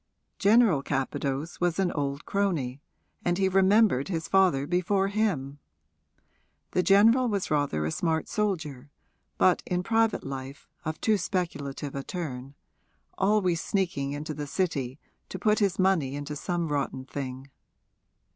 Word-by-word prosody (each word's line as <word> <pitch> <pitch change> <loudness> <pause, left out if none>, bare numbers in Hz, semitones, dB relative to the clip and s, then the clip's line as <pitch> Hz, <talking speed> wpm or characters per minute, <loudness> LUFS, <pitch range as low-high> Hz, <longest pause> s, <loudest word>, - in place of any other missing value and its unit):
General 205 - +5
Capadose 140 +2 -2
was 175 -2 +1
an 190 -2 +1
old 140 -1 -3
crony, 155 -10 -1 0.4
and 175 0 +1
he 190 -1 +2
remembered 190 - +4
his 165 -4 -3
father 185 -8 +3
before 185 +4 +1
him. 165 -10 -1 1.1
The 180 - +2
general 220 +8 +5
was 200 -7 -2
rather 145 - +1
a 80 - -1
smart 160 - -1
soldier, 160 -10 -2 0.5
but 185 -2 +4
in 180 0 -2
private 225 +1 +1
life 135 0 -7 0.2
of 155 0 -3
too 215 -2 +2
speculative 145 -8 -3
a 140 - -3
turn 135 -5 -6 0.6
always 190 -4 +2
sneaking 160 -8 -1
into 150 +2 -4
the 145 0 -5
City 140 -7 -2 0.3
to - - -5
put 215 -1 +2
his 195 -3 +1
money 185 -8 +2
into 145 +1 -5
some 170 +2 -2
rotten 140 -2 -2
thing. 135 -1 -6
165 Hz, 135 wpm, -27 LUFS, 140-195 Hz, 1.1 s, General